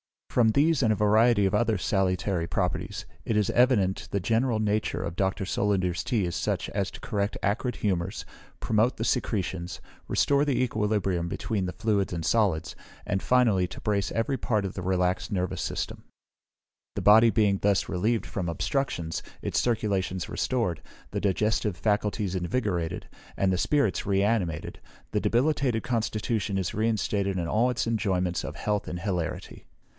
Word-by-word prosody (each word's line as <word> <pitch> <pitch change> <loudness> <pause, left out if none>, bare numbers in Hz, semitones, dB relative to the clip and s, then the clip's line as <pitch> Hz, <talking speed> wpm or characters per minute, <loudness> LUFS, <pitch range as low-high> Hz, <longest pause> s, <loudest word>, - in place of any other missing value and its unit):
From 115 -3 +4
these 150 +4 +3
and 110 -4 +3
a - - 0
variety 105 +1 +4
of 95 - +1
other 110 0 +2
salutary 95 -1 0
properties, - - -2 0.2
it 115 - 0
is 105 -2 +2
evident 115 -7 +2
the 100 - 0
general 115 +3 +1
nature 105 0 0
of 85 - -5
Dr. 95 0 0
Solander's 95 -3 0
tea 115 -5 +1
is 85 - -3
such - - -1
as 100 -1 -1
to - - -11
correct 105 -3 -2
acrid 110 +4 0
humours, 95 -1 -2 0.4
promote 110 +3 +2
the 115 - -3
secretions, 95 -6 -1 0.3
restore 140 0 +2
the 130 -4 +1
equilibrium 105 -7 0
between 100 +1 -2
the 90 - -4
fluids 105 -5 0
and 85 -2 -3
solids, 100 -8 +1 0.3
and 95 -2 -1
finally 115 -8 +3
to - - -10
brace 100 -2 0
every 115 +4 0
part 110 -6 0
of 95 - -4
the 95 - -5
relaxed 90 0 0
nervous 90 -2 -1
system. - - -4 0.9
The - - -2
body 110 +3 +7
being 105 -3 +2
thus 100 -2 +2
relieved 110 +5 0
from 95 -3 -4
obstructions, 85 - -2 0.2
its - - 0
circulations 95 -6 -1
restored, 115 - -1 0.3
the - - -2
digestive 105 0 +1
faculties 105 -1 0
invigorated, 90 -3 -2 0.3
and 95 -1 +1
the 90 - +1
spirits 140 -1 +1
re 100 -1 +2
animated, 100 -8 -1 0.3
the - - 0
debilitated 125 -3 +1
constitution 110 -2 -1
is 95 - -2
reinstated 105 -3 0
in 85 -2 -2
all 115 +4 +3
its 125 -1 -1
enjoyments 95 -6 0
of - - -6
health 105 -1 -2
and 90 - -5
hilarity. 90 -5 -4
105 Hz, 160 wpm, -27 LUFS, 95-115 Hz, 0.9 s, body